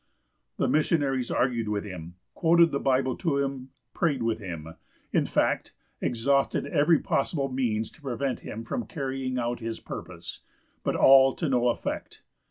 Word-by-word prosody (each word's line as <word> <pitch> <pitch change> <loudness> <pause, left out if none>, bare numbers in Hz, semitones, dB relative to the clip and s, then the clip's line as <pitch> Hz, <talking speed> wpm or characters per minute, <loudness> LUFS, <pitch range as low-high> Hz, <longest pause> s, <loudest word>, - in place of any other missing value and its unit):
The - - +1
missionaries 145 -5 +1
argued 120 -3 0
with 105 -1 -1
him, 90 -4 -8 0.2
quoted 170 0 +4
the 140 - 0
Bible 130 -1 +1
to 160 -6 0
him, 135 -2 -2 0.2
prayed 145 -8 0
with 115 -1 0
him, 85 -5 -7 0.4
in - - +2
fact, - - 0 0.3
exhausted 135 +4 +1
every 160 +1 +4
possible 140 0 0
means 115 -4 -1
to - - -20
prevent 135 -1 -2
him 115 +1 -7 0.2
carrying 135 -4 -3
out 120 -1 -1
his 115 -1 -4
purpose; - - -8 0.4
but - - 0
all 135 0 +7
to 165 - -2
no 125 -3 +2
effect. 120 - -4
130 Hz, 150 wpm, -27 LUFS, 115-140 Hz, 0.4 s, all